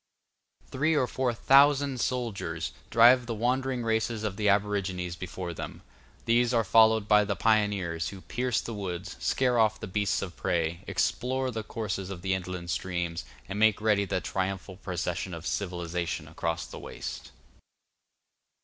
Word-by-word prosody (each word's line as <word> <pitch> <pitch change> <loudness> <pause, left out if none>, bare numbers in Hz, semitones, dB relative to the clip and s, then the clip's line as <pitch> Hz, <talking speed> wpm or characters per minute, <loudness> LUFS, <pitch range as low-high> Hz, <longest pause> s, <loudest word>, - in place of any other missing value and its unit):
Three 155 +4 +1
or 140 -4 +3
four 125 0 -1
thousand 140 +2 +4
soldiers 100 -11 -2 0.2
drive 120 +2 +6
the 115 - -2
wandering 125 +2 0
races 110 0 0
of 105 -3 -2
the 105 0 +1
aborigines 100 -3 0
before 90 0 -5
them; - - -7 0.4
these 120 +1 +3
are 115 - +3
followed 110 0 +5
by 105 0 +6
the 100 - -1
pioneers, 100 -7 +1
who 95 -1 -10
pierce 125 +3 -1
the 115 - -6
woods, 95 -2 -5
scare 125 -2 +1
off 110 -1 +3
the - - -5
beasts 100 +1 0
of 90 -2 -7
prey, 85 0 -1
explore 130 +1 0
the 110 -1 -3
courses 105 -3 -4
of 90 -3 -7
the 95 -1 +1
inland 90 -1 -4
streams, 85 -2 -2 0.2
and 100 +2 -4
make 110 -2 +4
ready 105 -2 +2
the 90 - -1
triumphal 95 +2 -3
procession 90 -1 -3
of 85 +1 -9
civilization 85 -4 -3
across 80 0 -3
the - - -9
waste. - - -7
105 Hz, 155 wpm, -28 LUFS, 90-115 Hz, 0.4 s, drive